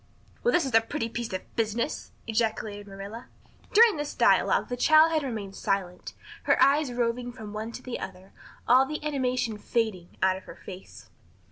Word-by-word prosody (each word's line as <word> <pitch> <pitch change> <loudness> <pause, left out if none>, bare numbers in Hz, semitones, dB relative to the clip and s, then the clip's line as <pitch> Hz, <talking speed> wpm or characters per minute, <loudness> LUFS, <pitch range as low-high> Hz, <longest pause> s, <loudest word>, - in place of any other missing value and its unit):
"Well, 485 - +3
this 350 -8 +3
is 265 - -4
a 225 - +7
pretty 230 0 -3
piece 235 0 -4
of 185 0 -7
business!" 225 +1 -2
ejaculated 220 -2 -2
Marilla. 200 +4 -8 0.4
During 445 -3 +6
this 295 0 -4
dialogue - - +3
the 245 - -3
child 310 +5 +6
had 315 -1 +2
remained 215 -8 -5
silent, 185 -2 -2 0.3
her - - +3
eyes 285 -1 +4
roving 245 0 -1
from 220 -4 -9
one 220 +2 -4
to 250 - -9
the 255 - -5
other, 190 +1 -8 0.4
all 260 +2 +6
the 305 +1 -5
animation 250 -6 -1
fading 215 -7 -2
out 190 0 +3
of 190 - -13
her - - -10
face. 190 -1 -12
230 Hz, 175 wpm, -27 LUFS, 205-265 Hz, 0.4 s, a